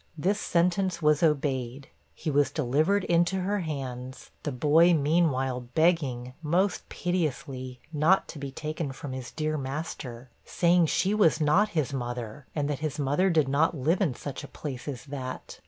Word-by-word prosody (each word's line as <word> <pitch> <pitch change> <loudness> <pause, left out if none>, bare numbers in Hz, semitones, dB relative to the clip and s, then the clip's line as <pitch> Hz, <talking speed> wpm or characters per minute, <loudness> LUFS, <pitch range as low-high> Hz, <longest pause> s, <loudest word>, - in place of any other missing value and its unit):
This 195 +7 +1
sentence 180 +1 +1
was 150 -2 +3
obeyed; 135 -4 0 0.3
he 155 - -3
was 145 0 +3
delivered 155 +8 +1
into 175 +2 +2
her 200 +3 0
hands, 130 -6 -6
the 150 - -3
boy 155 +6 +5
meanwhile 140 -4 +1 0.2
begging, 140 -7 +1
most 180 +5 0
piteously, 140 -7 -3
not 155 +6 +3
to 155 - -8
be 140 -1 -4
taken 150 0 -4
from 135 0 -7
his 130 -2 -6
dear 155 -1 -2
master, 130 -3 -6
saying 175 -1 +3
she 195 +6 +1
was 195 -7 +4
not 160 +8 +3
his 145 -3 0
mother, 120 0 -5
and 145 -2 0
that 145 -2 -2
his 155 -1 -3
mother 145 +7 +2
did 155 -5 +3
not 150 +4 +2
live 160 +8 +1
in 155 -11 +1
such 145 +2 -6
a - - -7
place 135 -4 -7
as 135 -5 -5
that. 135 -3 -7
150 Hz, 165 wpm, -28 LUFS, 130-170 Hz, 0.3 s, boy